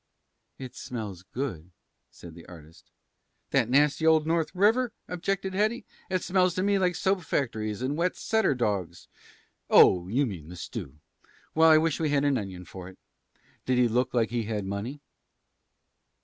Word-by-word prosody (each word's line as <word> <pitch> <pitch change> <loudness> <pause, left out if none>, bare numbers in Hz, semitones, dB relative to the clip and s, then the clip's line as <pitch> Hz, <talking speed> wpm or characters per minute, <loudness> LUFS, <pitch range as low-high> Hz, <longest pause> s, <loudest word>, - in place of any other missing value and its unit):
"It 130 -2 -9
smells 105 -7 -6
good," 105 - -4 0.4
said 85 -2 -13
the 85 0 -14
artist. 80 -2 -15 0.6
"That 115 - +2
nasty 145 +4 +3
old 160 -1 +4
North 165 0 0
River?" 225 +5 +3
objected 190 +2 -3
Hetty. 215 +5 0 0.2
"It 185 -1 -1
smells 180 -1 +2
to 185 - 0
me 200 0 +2
like 180 -2 +1
soap 190 +1 0
factories 110 - -2
and 135 +3 -1
wet 175 +3 0
setter 220 -10 +1
dogs 100 -8 -2 0.6
oh, 90 -1 +6
you 130 +9 +1
mean 90 - -7
the 90 - -9
stew. 75 -4 -7 0.6
Well, 160 +1 +5
I 155 - +7
wish 160 -1 +1
we 160 -2 0
had 145 0 +1
an 140 -3 +2
onion 95 -3 -7
for 90 +1 -10
it. 95 - -16 0.7
Did 130 -1 +2
he 125 -1 +4
look 120 +2 0
like 115 -3 0
he 120 -2 -1
had 105 -2 -3
money?" 105 +9 -5
130 Hz, 165 wpm, -27 LUFS, -, 0.7 s, I